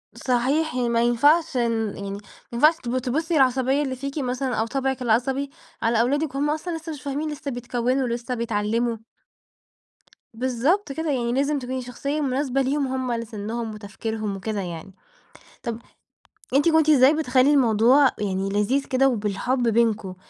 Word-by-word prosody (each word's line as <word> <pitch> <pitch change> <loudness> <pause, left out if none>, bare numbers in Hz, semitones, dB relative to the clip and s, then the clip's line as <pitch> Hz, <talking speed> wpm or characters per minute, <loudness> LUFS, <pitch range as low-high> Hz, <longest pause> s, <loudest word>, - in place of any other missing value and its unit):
صحيح، 265 +5 0
ي 245 -2 0
ما 230 0 +2
ينفعش 275 +5 +3
إن 225 -3 0
يعني، 200 0 -6
ما 200 - -5 0.3
ينفعش 305 +7 +5
تب 245 +1 -1
تبُصّي 305 +7 -1
العصبية 265 +1 +3
اللي 260 -2 -3
فيكِ 275 +3 -6
مثلًا 255 -1 -2
أو 220 +1 0
طبعِك 265 0 -2
العصبي 260 +4 +1 0.3
على 230 0 +2
أولادِك 285 +3 0
وهُم 290 +2 0
أصلًا 325 +2 -2
لسه 325 0 -7
مش 285 - -10
فاهمين، 290 +2 -3
لسه 295 -1 -5
بيتكوّنوا، 245 +2 -1
لسه 235 +1 -3
بيتعلموا. 230 +1 -1 1.4
بالضبط 260 - 0
كده، 320 +2 -2
يعني 240 -3 -1
لازم 280 +2 +1
تكوني 255 0 -4
شخصية 280 +5 -3
مناسبة 270 0 0
ليهم 275 +1 0
هُم 260 -1 -2
على 230 -1 -2
سنّهم 220 +1 -5
وتفكيرهم 215 0 -5
وكده 205 +1 -3
يعني، 175 +1 -7 0.7
طَب 230 -2 -4 0.8
أنتِ 290 +4 +4
كنتِ 320 -1 +3
إزاي 275 0 +6
بتخلّي 285 -3 +3
الموضوع 255 +1 +5
يعني 195 -1 -1
لذيذ 210 +8 +1
كده 270 +1 +2
وبالحب 235 +3 -1
بينكم؟ 220 -4 +1
255 Hz, 155 wpm, -24 LUFS, 230-280 Hz, 1.4 s, إزاي